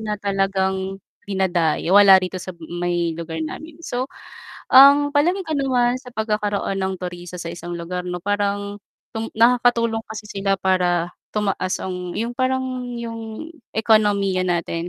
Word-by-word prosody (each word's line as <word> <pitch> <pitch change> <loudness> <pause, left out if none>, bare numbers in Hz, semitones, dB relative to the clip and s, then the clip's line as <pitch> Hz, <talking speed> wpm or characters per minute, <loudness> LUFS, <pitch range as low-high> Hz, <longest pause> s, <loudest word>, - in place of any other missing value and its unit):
na 210 -1 -3
talagang 195 -1 -1 0.3
dinadayo 180 -3 0
wala 200 -1 +9
rito 185 0 -2
sa 185 0 -8
may 175 0 -2
lugar 165 0 -6
namin. 310 - -8
So 255 -1 -3 0.6
ang 285 +2 +8
palagay 350 +6 +2
ko 315 - -4
naman 250 -2 +2
sa 255 - -13
pagkakaroon 210 -2 -1
ng 190 0 -1
turista 180 0 -6
sa 170 0 -5
isang 175 0 -6
lugar 180 +1 -5
'no? 180 - -3
Parang 205 0 -1 0.3
tong 225 0 -4
nakakatulong 235 -1 +3
kasi 215 0 -7
sila 195 -1 0
para 180 -2 +1 0.2
tumaas 195 -3 -1
ang 180 -1 -5
yung 230 +2 -2
parang 260 +1 0 0.3
yung 230 +6 -7 0.2
ekonomiya 205 -4 +3
natin. 170 0 -2
200 Hz, 140 wpm, -21 LUFS, 180-230 Hz, 0.6 s, wala